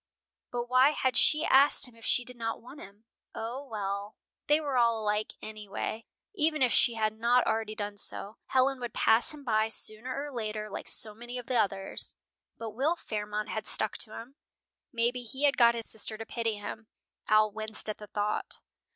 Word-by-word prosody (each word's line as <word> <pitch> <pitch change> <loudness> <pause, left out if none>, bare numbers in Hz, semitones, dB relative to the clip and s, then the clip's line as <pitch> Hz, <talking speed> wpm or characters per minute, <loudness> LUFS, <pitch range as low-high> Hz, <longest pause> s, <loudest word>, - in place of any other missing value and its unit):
But 240 -1 -1
why 255 +4 +5
had 260 -4 0
she 305 +5 +5
asked 275 0 +5
him 245 - -16
if 230 - -16
she 245 - +2
did 250 - -10
not 225 -1 -3
want 275 +5 -12
him? 200 +3 -13 0.3
O, 235 +5 -4
well, 205 -4 -4 0.3
they 295 +1 +5
were 290 -4 -2
all 235 -2 +4
alike 210 0 -1
anyway! 215 +1 -5 0.3
Even 310 -6 +2
if 250 - +3
she 235 - +4
had 215 -1 +1
not 240 +2 +4
already 220 -1 -1
done 205 -1 -4
so, 205 +2 -5
Helen 265 +1 +2
would 240 -2 -5
pass 230 +8 +5
him 300 -2 -9
by 215 -3 +2
sooner 235 +5 0
or 295 - -6
later, 215 -3 -4
like - - -6
so 215 -1 -4
many 240 +3 -7
of 245 - -6
the 255 - -2
others. 195 -3 -1 0.4
But 225 -1 -5
Will 275 +10 +1
Fairmont 210 -6 -4
had 220 - -3
stuck 215 - +4
to 215 - -5
him. 250 +5 -10 0.5
Maybe 240 0 0
he 260 +4 -5
had 285 -1 +5
got 235 -1 +6
his 230 -1 -4
sister 220 0 -5
to 225 - -6
pity 230 -2 -2
him. 205 +2 -7 0.4
Al 215 0 +5
winced 220 +1 -3
at 215 - 0
the 210 - -9
thought. 205 +1 -1
225 Hz, 195 wpm, -30 LUFS, 215-255 Hz, 0.5 s, got